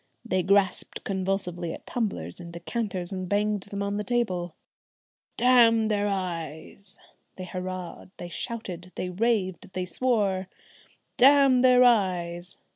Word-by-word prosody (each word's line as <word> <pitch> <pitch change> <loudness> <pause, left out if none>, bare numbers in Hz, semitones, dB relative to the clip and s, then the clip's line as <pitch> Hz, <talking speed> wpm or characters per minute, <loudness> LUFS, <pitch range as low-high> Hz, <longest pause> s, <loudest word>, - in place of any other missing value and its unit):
they 185 - +1
grasped 195 +1 +1
convulsively 185 -3 -2
at - - -9
tumblers 140 - -3
and 170 -1 -9
decanters 185 0 -4
and 185 -2 -4
banged 210 0 +1
them 200 +1 -5
on 200 0 -2
the 210 - -2
table. 185 -8 -1 0.8
"Damn 230 -3 +5
their 205 -1 +1
eyes!" 185 0 -5 0.4
they 185 - -7
hurrahed, 185 -1 -6
they 175 - -7
shouted, 185 -2 -5
they 180 - -3
raved, 200 -2 0
they 185 0 -2
swore. 200 -4 0 0.7
"Damn 270 -1 +6
their 250 -1 +6
eyes!" 180 -7 +1
190 Hz, 125 wpm, -26 LUFS, 180-220 Hz, 0.8 s, Damn